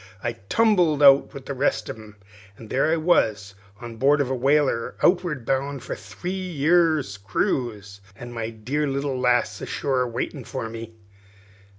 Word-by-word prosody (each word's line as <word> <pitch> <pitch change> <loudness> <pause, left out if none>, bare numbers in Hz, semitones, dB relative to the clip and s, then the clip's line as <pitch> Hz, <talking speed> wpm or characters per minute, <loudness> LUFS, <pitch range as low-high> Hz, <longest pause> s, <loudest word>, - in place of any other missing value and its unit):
I 120 - -1 0.2
tumbled 180 -10 +3
up 140 0 +7
with 135 -1 -10
the 140 - -4
rest; 125 -5 0
an' 110 -2 -9 0.4
there 130 +7 0
I - - +3
was 110 - +1 0.3
on 120 -2 -9
board 140 +4 +3
of 135 -2 0
a - - 0
whaler 135 -2 +1
outward 175 -8 +2
bound 135 0 -1
for - - -5
a - - -5
three 180 - -7
years' 165 - +1
cruise, 100 0 -2
an' 120 +3 -9
my 115 -1 -3
dear 125 +7 -2
little 135 -1 -2
lass 125 -1 +1
ashore 135 -2 -1
awaitin' 125 +3 -3
for 115 0 -5
me." 115 0 -8
130 Hz, 160 wpm, -24 LUFS, 115-150 Hz, 0.4 s, up